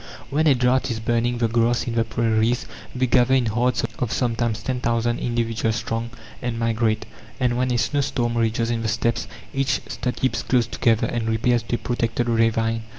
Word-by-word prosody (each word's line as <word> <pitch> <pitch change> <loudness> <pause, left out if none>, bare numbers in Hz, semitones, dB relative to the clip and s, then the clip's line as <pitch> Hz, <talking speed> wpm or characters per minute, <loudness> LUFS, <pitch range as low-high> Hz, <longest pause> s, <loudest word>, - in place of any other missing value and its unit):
When 155 +3 +2
a 140 - +6
drought 125 +1 +2
is 115 -2 -2
burning 120 +1 0
the 120 -1 +2
grass 115 +1 +1
in 120 - -3
the 115 -1 +2
prairies, 115 +1 +1 0.3
they 130 0 +2
gather 125 +1 +4
in 130 -2 +2
herds 120 +3 +1 0.2
of 120 - -1
sometimes 115 -3 -1
10,000 120 -2 0
individuals 115 -2 -1
strong, 115 0 -3 0.3
and 120 -2 -2
migrate. 115 -1 0 0.3
And 125 -2 +1
when 125 +1 0
a 120 - +1
snow 145 +4 +1
storm 120 -3 -1
rages 115 0 +1
in 115 -1 -1
the 115 - -1
Steppes, 115 +2 0 0.3
each 135 0 +1
stud 125 - -3
keeps 130 - 0
close 125 -2 +2
together, 115 -1 +1
and 115 -1 -2
repairs 120 +2 +2
to - - 0
a - - -1
protected 120 0 -1
ravine. 115 0 +1
120 Hz, 190 wpm, -23 LUFS, 115-125 Hz, 0.3 s, a